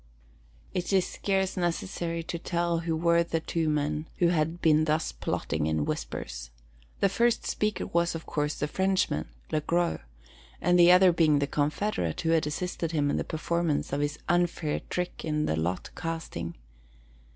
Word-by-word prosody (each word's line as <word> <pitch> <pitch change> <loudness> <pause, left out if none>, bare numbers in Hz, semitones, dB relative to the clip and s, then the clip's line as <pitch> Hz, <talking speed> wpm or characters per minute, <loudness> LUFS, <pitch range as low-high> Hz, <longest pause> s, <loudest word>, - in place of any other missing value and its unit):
It 180 +1 -2
is 190 -2 +4
scarce 190 -1 -1
necessary 170 - -2
to 170 +1 -4
tell 170 -1 0
who 165 -1 -1
were 170 +1 +3
the 165 -1 -1
two 160 0 -1
men 150 +1 -1
who 175 - +4
had 165 0 0
been 155 -1 +4
thus 155 +1 0
plotting 75 0 -2
in 80 -1 0
whispers. - - -4 0.5
The - - +5
first 235 +4 +1
speaker 210 -1 -1
was, 170 0 +1
of 165 - -6
course, 150 0 -1
the 150 - -2
Frenchman, 190 - 0 0.2
Le 155 - +1
Gros, 170 +2 +1 0.6
the 175 0 +6
other 180 0 +7
being 160 -3 +4
the 140 - +2
confederate 145 - -1
who 165 - +1
had 160 -2 +3
assisted 165 +1 -3
him 145 -2 +2
in - - 0
the - - 0
performance 160 -2 -1
of 140 - 0
his 145 +1 -1
unfair 175 -3 +1
trick 180 0 -3
in 150 -1 0
the - - 0
lot 85 +3 -2
casting. 160 - -4
165 Hz, 165 wpm, -28 LUFS, 150-175 Hz, 0.6 s, other